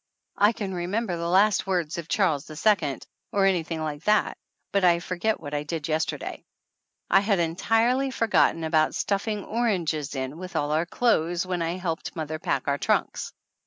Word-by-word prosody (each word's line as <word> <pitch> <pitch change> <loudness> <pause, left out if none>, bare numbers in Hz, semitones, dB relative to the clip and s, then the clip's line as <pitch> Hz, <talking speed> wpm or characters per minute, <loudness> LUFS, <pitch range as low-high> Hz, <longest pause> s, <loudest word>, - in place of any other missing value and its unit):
I 205 +2 +6
can 205 -4 -5
re 175 -1 -3
member 205 -1 -1
the 170 0 -3
last 195 +2 +3
words 175 -4 -1
of 165 - -7
Charles 165 -8 +1
II, 155 -4 +1 0.3
or 200 -1 +2
any 190 -3 +3
thing 160 -1 -4
like 150 0 -4
that, 210 0 +3 0.4
but 200 -1 +1
I 175 -1 +5
forget 185 +5 -1
what 145 - -8
I 145 - 0
did 150 0 -4
yester 160 0 0
day. - - -7 0.7
I 195 - +7
had 200 0 +1
entirely 225 +10 +1
forgotten 225 -8 +2
about 155 -1 +2
stuffing 205 +1 -1
oranges 170 - -1
in 135 +4 -4
with 185 +1 -8
all 145 0 0
our 160 +3 +1
clothes 175 -6 +1
when 180 -2 -2
I 165 +2 -1
helped 170 -3 -4
mother 155 -1 -4
pack - - -1
our 140 0 +1
trunks - - 0
175 Hz, 185 wpm, -26 LUFS, 155-200 Hz, 0.7 s, I